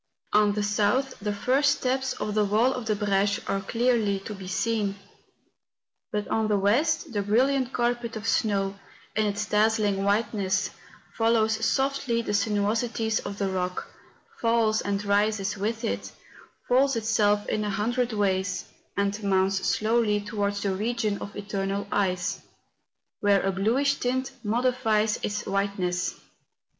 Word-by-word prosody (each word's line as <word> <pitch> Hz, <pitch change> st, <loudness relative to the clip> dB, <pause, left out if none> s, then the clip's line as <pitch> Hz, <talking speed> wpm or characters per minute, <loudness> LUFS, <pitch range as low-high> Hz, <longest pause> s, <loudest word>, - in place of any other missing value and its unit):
On 210 Hz, -1 st, +4 dB
the 210 Hz, 0 st, -1 dB
south, 210 Hz, +6 st, +1 dB
the 210 Hz, +1 st, -2 dB
first 265 Hz, +8 st, +2 dB
steps 260 Hz, 0 st, 0 dB
of 210 Hz, 0 st, -4 dB
the 215 Hz, 0 st, +3 dB
wall 220 Hz, +6 st, +3 dB
of 250 Hz, -3 st, -5 dB
the 215 Hz, -, +2 dB
Breche 200 Hz, 0 st, +1 dB
are 195 Hz, 0 st, 0 dB
clearly 230 Hz, -1 st, +1 dB
to 210 Hz, -, -6 dB
be 195 Hz, -2 st, -9 dB
seen; 205 Hz, +1 st, 0 dB, 1.2 s
but 210 Hz, 0 st, -2 dB
on 220 Hz, -1 st, 0 dB
the 210 Hz, -1 st, +2 dB
west, 260 Hz, -, +1 dB
the 205 Hz, -, 0 dB
brilliant 255 Hz, +5 st, +2 dB
carpet 240 Hz, -2 st, -1 dB
of 220 Hz, +1 st, -5 dB
snow, 200 Hz, -3 st, +1 dB, 0.4 s
in 215 Hz, -1 st, +2 dB
its 205 Hz, +1 st, -2 dB
dazzling 210 Hz, -2 st, +2 dB
whiteness, 200 Hz, -1 st, 0 dB, 0.4 s
follows 225 Hz, -1 st, +2 dB
softly 265 Hz, -2 st, +1 dB
the 210 Hz, -, -2 dB
sinuosities 220 Hz, +2 st, 0 dB
of 200 Hz, -, -6 dB
the 200 Hz, -, 0 dB
rock, 180 Hz, -1 st, -2 dB, 0.5 s
falls 230 Hz, -2 st, +2 dB
and 200 Hz, 0 st, -2 dB
rises 205 Hz, 0 st, +1 dB
with 220 Hz, +4 st, -3 dB
it, 225 Hz, -, -3 dB, 0.6 s
folds 270 Hz, +2 st, +3 dB
itself 210 Hz, -2 st, +2 dB
in 215 Hz, -, -1 dB
a 210 Hz, -, -1 dB
hundred 240 Hz, +5 st, 0 dB
ways, 195 Hz, -3 st, 0 dB, 0.3 s
and 200 Hz, +1 st, 0 dB
mounts 190 Hz, 0 st, +2 dB
slowly 215 Hz, -1 st, +2 dB
towards 205 Hz, -1 st, -2 dB
the 195 Hz, -2 st, 0 dB
region 215 Hz, 0 st, -1 dB
of 200 Hz, -, -8 dB
eternal 200 Hz, -1 st, -3 dB
ice, 185 Hz, -3 st, 0 dB, 0.8 s
where 200 Hz, -1 st, +3 dB
a 195 Hz, -, +1 dB
bluish 245 Hz, +9 st, +1 dB
tint 260 Hz, +2 st, -1 dB
modifies 225 Hz, -2 st, +1 dB
its 210 Hz, 0 st, -2 dB
white¬ 200 Hz, +1 st, -1 dB
ness. 180 Hz, -1 st, -1 dB
210 Hz, 145 wpm, -26 LUFS, 200-230 Hz, 1.2 s, On